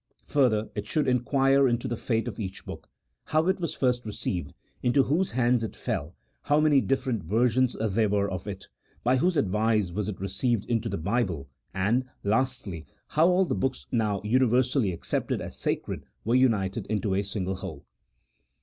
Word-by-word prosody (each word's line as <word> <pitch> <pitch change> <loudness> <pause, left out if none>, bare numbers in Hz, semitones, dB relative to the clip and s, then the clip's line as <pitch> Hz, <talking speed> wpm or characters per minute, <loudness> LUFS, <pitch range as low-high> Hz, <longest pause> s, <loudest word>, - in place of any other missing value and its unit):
Further, 115 -7 +2
it 105 0 -4
should 150 +4 +1
inquire 135 +2 +3
into 120 +1 0
the 120 - -2
fate 115 0 -1
of 110 -3 -5
each 95 -3 -5
book: - - -9 0.4
how 155 +1 +2
it 190 0 +2
was 170 -4 -3
first 125 -2 +1
received, 90 -7 -3 0.3
into 130 +3 +3
whose 165 +9 +1
hands 120 -1 +2
it 110 - -4
fell, 75 +5 -3 0.3
how 145 +1 +2
many 150 -3 +5
different 130 -5 0
ver 110 +9 +2
sions 130 +1 +1
there 110 0 +1
were 100 0 +1
of 95 0 -5
it, 95 -2 -6 0.4
by 125 +2 +3
whose 175 +5 +2
advice 105 -4 +1
was 105 +3 -2
it 100 - -6
received 105 +3 -1
into 115 -1 -1
the - - -2
Bible, 90 - -1 0.2
and, 105 +7 +1 0.2
lastly, 105 -7 -1 0.2
how 160 +3 +4
all 185 +1 +4
the - - -1
books 135 -1 -2
now 105 -4 0
universally 125 0 +2
accepted 85 - -2
as - - -7
sacred, - - -3 0.2
were 115 - +1
united 110 -5 +2
into 105 -2 0
a 95 - +2
single 95 -2 -3
whole. - - -8
115 Hz, 175 wpm, -27 LUFS, 100-130 Hz, 0.4 s, many